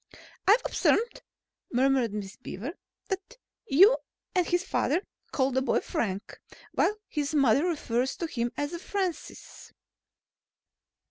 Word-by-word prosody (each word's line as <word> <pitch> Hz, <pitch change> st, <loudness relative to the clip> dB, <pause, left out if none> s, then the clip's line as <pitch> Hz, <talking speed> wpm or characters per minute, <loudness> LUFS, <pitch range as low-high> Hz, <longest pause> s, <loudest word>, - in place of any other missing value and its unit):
"I've 435 Hz, +5 st, +6 dB
observed," 470 Hz, +1 st, +1 dB, 0.5 s
murmured 260 Hz, -2 st, +3 dB
Miss 205 Hz, 0 st, -5 dB
Beaver, 245 Hz, -, -6 dB, 0.4 s
"that 390 Hz, +5 st, -4 dB, 0.3 s
you 400 Hz, -, +7 dB, 0.4 s
and 360 Hz, -3 st, +2 dB
his 350 Hz, 0 st, +1 dB
father 355 Hz, 0 st, 0 dB, 0.3 s
call 265 Hz, -1 st, +1 dB
the 260 Hz, +1 st, +1 dB
boy 260 Hz, -, +2 dB
Frank, 195 Hz, -2 st, -3 dB, 0.3 s
while 420 Hz, -, +2 dB
his 295 Hz, 0 st, -2 dB
mother 275 Hz, +3 st, +4 dB
refers 260 Hz, -6 st, 0 dB
to 340 Hz, -, -2 dB
him 240 Hz, -6 st, -2 dB
as 310 Hz, +4 st, -3 dB
Francis." 380 Hz, -5 st, -4 dB
290 Hz, 120 wpm, -28 LUFS, 245-365 Hz, 0.5 s, you